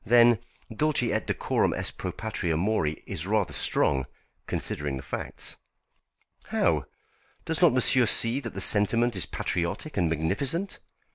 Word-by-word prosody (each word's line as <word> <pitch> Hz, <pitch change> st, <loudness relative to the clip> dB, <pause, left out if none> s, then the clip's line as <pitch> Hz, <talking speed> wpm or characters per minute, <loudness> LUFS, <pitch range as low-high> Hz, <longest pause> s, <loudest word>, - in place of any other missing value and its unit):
Then 120 Hz, -1 st, +5 dB, 0.4 s
'Dulce 150 Hz, 0 st, +1 dB
et -, -, -2 dB
decorum -, -, 0 dB
est -, -, -3 dB
pro -, -, -4 dB
patria 80 Hz, -2 st, -3 dB
mori' 85 Hz, -5 st, -1 dB
is 80 Hz, -, -4 dB
rather 105 Hz, -2 st, 0 dB
strong, 65 Hz, -2 st, +1 dB, 0.4 s
considering 75 Hz, -2 st, -3 dB
the 65 Hz, -, -8 dB
facts." -, -, -3 dB, 0.9 s
"How? -, -, 0 dB, 0.6 s
Does 160 Hz, +1 st, -2 dB
not 175 Hz, -, +6 dB
monsieur 125 Hz, -1 st, +4 dB
see 115 Hz, +5 st, +4 dB
that 120 Hz, -5 st, -8 dB
the 95 Hz, -, -3 dB
sentiment 115 Hz, +4 st, +4 dB
is 95 Hz, -, -2 dB
patriotic 90 Hz, -, -3 dB
and 85 Hz, -4 st, +2 dB
magnificent?" 100 Hz, -, -2 dB
110 Hz, 140 wpm, -27 LUFS, 85-125 Hz, 0.9 s, not